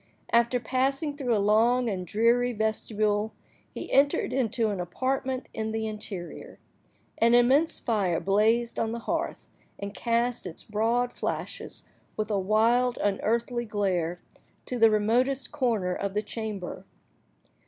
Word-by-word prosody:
After 235 +1 +4
passing 275 +4 0
through 255 -5 0
a - - +2
long 225 +5 +3
and 185 -4 -3
dreary 235 +5 +2
vestibule, 215 -1 0 0.4
he - - -7
entered 275 -2 +3
into 230 -3 +1
an 200 - -3
apartment 260 +8 -2
in 220 0 -3
the 220 0 -1
interior. 210 -4 -6 0.6
An 235 +1 +5
immense 265 +7 +4
fire 200 -7 0
blazed 220 +4 +2
on 225 0 -1
the - - -3
hearth, 330 0 -2 0.3
and 200 0 -6
cast 235 -1 0
its 165 - -8
broad 230 +3 0
flashes - - -5 0.3
with 215 0 -2
a 200 - +1
wild, 230 +5 +2
unearthly 235 +4 0
glare, 185 -5 -1 0.5
to 250 - -4
the 225 0 +7
remotest 245 +6 +1
corner 230 -10 0
of 200 +1 -3
the 210 - 0
chamber. 215 -6 -5
225 Hz, 135 wpm, -27 LUFS, 210-245 Hz, 0.6 s, the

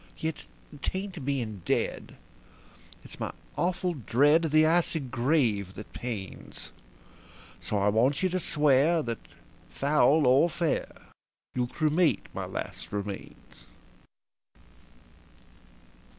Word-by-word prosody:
Yet 160 -1 -4 0.3
'tain't 190 -5 -3
being 120 -8 -2
dead - - -1 0.9
it's - - -11
my - - -3 0.2
awful 180 0 0
dread 145 +5 +3
of 160 - -2
the 155 0 +6
icy 165 0 +2
grave 120 - 0
that 105 - -10
pains; 110 -6 -6 0.9
So 105 - -2
I 100 +1 +3
want 125 - +2
you 185 - +3
to 185 +1 -1
swear 150 +1 +3
that, 115 -2 -3 0.5
foul 145 +1 +3
or 135 +7 +5
fair, 165 -2 -1 0.6
you'll 125 -1 0
cremate 155 +5 +1
my - - -4
last - - -6
remains." 100 -1 -7
140 Hz, 110 wpm, -28 LUFS, 120-160 Hz, 0.9 s, the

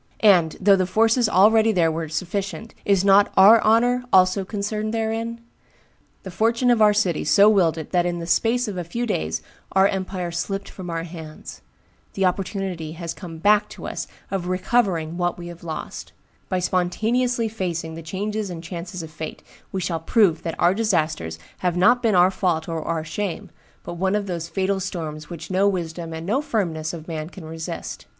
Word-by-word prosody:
And, 175 -6 +5
though 200 +1 +5
the 185 -1 0
forces 225 +3 +3
already 220 +4 +5
there 170 -5 +2
were 160 0 -4
sufficient, 195 +7 -4
is 195 -1 +3
not 200 +1 +5
our 210 +4 +8
honor 245 +3 +3
also 185 +1 +4
concerned 210 +2 -3
therein? 225 +1 -2 0.8
The 190 - -7
fortune 230 +6 +2
of 235 -2 +3
our 210 -1 +7
city 200 -6 +1
so 200 +6 +5
willed 180 -7 +3
it 160 - -7
that 175 -1 +2
in 175 0 -2
the 170 - -5
space 235 +7 +1
of 200 -3 -5
a - - -3
few 235 +9 -3
days 80 - -2 0.3
our 190 +1 +5
empire 185 -2 -3
slipped 195 +4 -3
from 185 -2 -8
our 165 -1 -3
hands; 160 -2 -10 0.5
the 195 - +1
opportunity 185 -3 -2
has 170 0 -5
come 170 -3 -9
back 210 +4 +3
to - - -10
us - - -4 0.2
of 190 -3 -2
recovering 185 -4 0
what 175 -1 -1
we 175 0 -8
have 175 0 -11
lost; 160 -2 -6 0.4
by 185 - 0
spontaneously 220 +7 0
facing 175 -7 -4
the 165 - -7
changes 205 +5 -3
and 170 -2 -7
chances 175 +1 -6
of 160 - -9
fate, 155 0 -7 0.3
we 190 - -2
shall 170 -2 -2
prove 170 -1 +2
that 165 -2 -4
our 175 +1 +4
disasters 160 - -1 0.2
have 180 -1 0
not 240 +7 +4
been 225 -4 +2
our 180 +1 +5
fault 175 -4 -1
or 165 -1 -3
our 165 0 -2
shame, 180 +3 -4 0.3
but - - -6
one 190 +3 +1
of 210 -1 -1
those 170 -3 -4
fatal 195 +1 0
storms 160 -5 -5
which 170 +2 -8
no 190 +2 +3
wisdom 170 -3 -3
and 160 0 -6
no 230 +9 +1
firmness 170 - -2
of 165 -2 -9
man 155 -1 -5
can 185 -2 -11
resist. 160 0 -6
185 Hz, 190 wpm, -23 LUFS, 165-210 Hz, 0.8 s, our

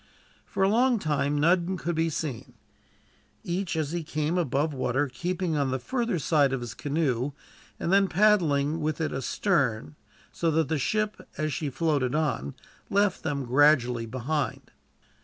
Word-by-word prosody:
For - - -1
a - - +5
long 240 +4 +3
time 145 -4 0
none 175 +4 +2
could 175 0 -2
be 165 0 +1
seen, 145 -6 -5 0.9
each 180 0 -2
as 155 -2 -1
he 170 -1 -2
came 155 +2 -2
above 150 -2 0
water 130 +2 0
keeping 175 +4 -2
on 140 -2 +1
the 130 - 0
further 235 - -1
side 145 -3 +2
of 135 - -2
his 120 -2 -6
canoe, 140 -3 -1 0.5
and 170 - 0
then 195 0 +5
paddling 165 -7 +3
with 155 0 -2
it 155 -2 -1
astern, 130 - 0 0.4
so 165 - 0
that 160 -2 +1
the 160 - 0
ship, 215 +8 -2
as 155 0 -1
she 150 0 -2
floated 140 -2 0
on, 145 - -1 0.3
left 200 -1 +2
them 140 -4 -2
gradually 125 -3 +3
behind. 130 +6 -3
155 Hz, 160 wpm, -27 LUFS, 135-175 Hz, 0.9 s, a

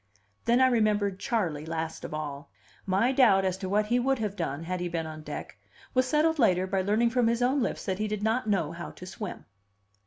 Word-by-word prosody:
Then 235 +2 +4
I - - +7
remembered 210 -5 +1
Charley, 185 - -1
last 160 0 -4
of - - -6
all. 145 -2 -5 0.4
My 195 +7 +3
doubt 225 -8 +5
as 185 -1 +1
to 190 -2 -4
what 210 +2 +2
he 240 +3 +2
would 270 +2 +1
have 210 -3 -3
done, 165 -4 -3
had 180 +2 -3
he 175 0 -2
been 165 -1 -2
on 155 0 -7
deck, - - -7 0.4
was 255 0 +2
settled 310 +3 +2
later 185 -6 +4
by 190 0 0
learning 215 +5 +2
from 245 -1 +2
his 235 +1 +1
own 265 +3 +2
lips - - -2
that 190 -1 -2
he 215 - 0
did 210 -1 -3
not 220 +1 0
know 175 -7 +1
how 170 0 -7
to 180 - -11
swim. 210 +3 -7
205 Hz, 225 wpm, -28 LUFS, 175-235 Hz, 0.4 s, I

